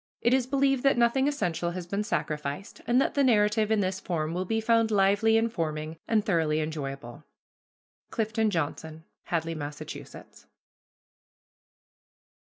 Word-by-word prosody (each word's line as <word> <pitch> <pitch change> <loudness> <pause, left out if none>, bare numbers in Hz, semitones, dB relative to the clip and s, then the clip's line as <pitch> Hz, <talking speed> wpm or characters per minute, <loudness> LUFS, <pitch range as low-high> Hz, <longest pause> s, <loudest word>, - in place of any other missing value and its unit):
It 235 - +2
is 260 -2 +2
believed 270 -1 +2
that 275 -2 +3
nothing 240 +3 +3
essential 175 - -1
has 180 -1 -5
been 200 +4 -2
sacrificed, 150 -2 -4
and 245 +1 +4
that - - +1
the 280 - +2
narrative 215 -3 +3
in 220 -2 +2
this 190 0 -1
form 165 -4 -2
will 180 +2 -2
be 225 +4 0
found 230 0 +3
lively, 205 +2 +3
informing, 160 -8 -2
and 220 -2 +2
thoroughly 160 -6 +1
enjoyable. 140 -4 -5 0.9
CLIFTON 220 -1 0
JOHNSON. 160 -2 -3 0.2
HADLEY, 165 -1 -1
MASSACHUSETTS. 145 -2 -9
200 Hz, 135 wpm, -28 LUFS, 160-225 Hz, 0.9 s, and